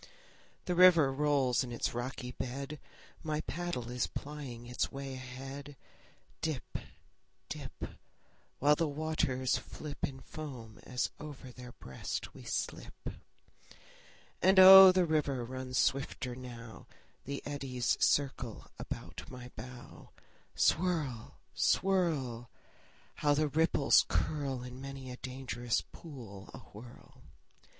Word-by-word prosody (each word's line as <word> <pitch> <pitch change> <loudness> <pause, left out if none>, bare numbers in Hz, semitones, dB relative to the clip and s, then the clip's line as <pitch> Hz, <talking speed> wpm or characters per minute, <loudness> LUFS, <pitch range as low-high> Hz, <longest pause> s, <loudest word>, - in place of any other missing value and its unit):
The 180 - 0
river 170 -6 +7
rolls 140 -3 +2
in 125 - -6
its 120 - -1
rocky 125 +1 -4
bed; 140 +4 -5 0.4
My 155 -1 -2
paddle 170 -10 -4
is 125 0 0
plying 140 -5 -7
its 125 +1 -1
way 135 0 -5
ahead; 135 +2 -8 0.6
Dip, 155 -5 -3 0.7
dip, - - -7 0.7
While 145 +2 +5
the 165 +1 +1
waters 145 -4 0
flip 150 -2 -8
In 135 -1 -2
foam 130 -8 -8
as 125 0 -1
over 140 -4 -9
their 125 0 -11
breast 65 - -5
we - - -12
slip. - - -4 1.3
And 190 +2 +5
oh, 190 0 +12
the 185 -1 +3
river 145 -6 0
runs 130 +1 -4
swifter 135 -2 0
now; 120 -3 -10 0.4
The 140 +1 -4
eddies 135 -4 -1
circle 130 -5 0
about - - -7
my 125 -1 -9
bow. 125 +2 -10 0.5
Swirl, 155 -10 +1 0.2
swirl! 150 -12 +1 0.7
How 145 -1 +3
the 155 0 +2
ripples 155 -2 +4
curl 140 -5 -1
In 125 +1 -8
many 135 -1 -7
a 125 - -7
dangerous 125 -2 -2
pool 115 - -10
awhirl! 120 +4 -13
135 Hz, 115 wpm, -33 LUFS, 125-150 Hz, 1.3 s, oh